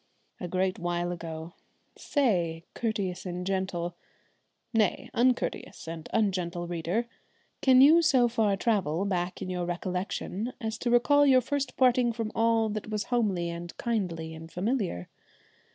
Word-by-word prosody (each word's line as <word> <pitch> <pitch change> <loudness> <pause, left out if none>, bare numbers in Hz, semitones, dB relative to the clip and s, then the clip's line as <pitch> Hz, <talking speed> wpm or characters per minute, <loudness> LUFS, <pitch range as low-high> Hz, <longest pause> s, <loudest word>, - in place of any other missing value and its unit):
A 180 - -4
great 185 +1 0
while 175 0 -1
ago! 165 -1 -6 0.4
Say, 175 - 0
courteous 200 -5 -2
and 180 -1 -4
gentle 185 -3 -2 0.8
nay, 220 -3 +1
uncourteous 245 -7 0
and 165 -1 -7
ungentle 180 -5 0
reader 175 +7 -1 0.6
can 260 -1 +6
you 315 +5 +8
so 265 -7 +4
far 220 -4 +1
travel 195 -6 0
back 180 -2 -2
in - - -5
your 180 -1 -2
recollection 185 +5 -3
as 220 -3 -4
to 245 - -1
recall 285 +4 +5
your 260 -2 +6
first 280 +1 -3
parting 250 -2 +4
from 225 -1 -3
all 225 0 +2
that 215 0 -4
was 210 -1 -1
homely 190 -8 +1
and 170 0 -7
kindly 180 -9 -2
and 160 +1 -10
familiar? 190 - -1
195 Hz, 140 wpm, -28 LUFS, 175-235 Hz, 0.8 s, you